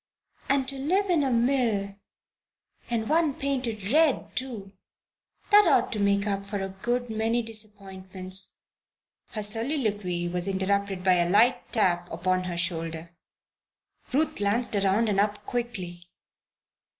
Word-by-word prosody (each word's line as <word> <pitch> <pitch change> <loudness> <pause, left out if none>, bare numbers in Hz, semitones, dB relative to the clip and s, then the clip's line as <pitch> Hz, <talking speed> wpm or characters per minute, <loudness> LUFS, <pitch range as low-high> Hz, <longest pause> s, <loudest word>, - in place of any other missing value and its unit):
And 270 -1 +2
to 270 0 -1
live 370 +8 +1
in 330 -4 +3
a 275 - +1
mill 230 -5 +1 0.9
and 225 -2 -1
one 315 -3 +2
painted 250 -7 -2
red, 310 -2 +2
too! 230 -7 -3 0.8
That 415 -2 +7
ought 245 - +3
to 215 - -2
make 200 0 +2
up 200 -1 -1
for 200 0 -4
a 195 - -4
good 240 +5 -3
many 225 +2 0
disappointments 195 -4 -2 0.4
" - - -67
Her 215 - -2
soliloquy 210 - 0
was 175 +1 0
interrupted 195 0 -1
by 185 -1 +4
a 175 0 +1
light 235 +6 +3
tap 175 -6 +1
upon 185 +2 -1
her 175 -1 -4
shoulder. 165 -1 -3 1.0
Ruth 300 +5 +1
glanced 210 +3 0
around 200 +3 +2
and 200 -2 +1
up 205 0 0
quickly. 185 -8 -4
205 Hz, 140 wpm, -26 LUFS, 190-245 Hz, 1.0 s, That